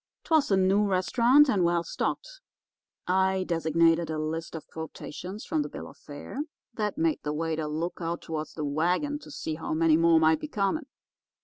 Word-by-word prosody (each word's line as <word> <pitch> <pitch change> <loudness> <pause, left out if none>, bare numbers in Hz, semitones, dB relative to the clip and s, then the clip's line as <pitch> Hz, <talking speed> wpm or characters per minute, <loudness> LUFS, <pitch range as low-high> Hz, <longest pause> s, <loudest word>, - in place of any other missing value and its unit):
"'Twas 315 -3 +2
a 195 - +4
new 190 +2 +3
restaurant 235 +9 +4
and 200 -9 +2
well 170 0 +2
stocked. - - -4 0.6
I 190 +1 +2
designated 165 -1 +2
a 155 - -2
list 160 +2 -4
of 160 - -7
quotations 180 +5 -7
from 310 -1 0
the - - -4
bill - - -8
of - - -13
fare - - -9 0.3
that 210 0 -2
made 320 -1 +1
the 150 - -3
waiter 160 0 -2
look 160 +4 -3
out 170 +1 -3
toward 155 -1 -4
the 155 - -3
wagon 180 - 0
to - - -13
see 160 - -4
how 155 0 -3
many 160 -1 +4
more 165 0 +5
might 160 0 +4
be - - -5
coming. 265 +4 -1
170 Hz, 185 wpm, -28 LUFS, 160-210 Hz, 0.6 s, more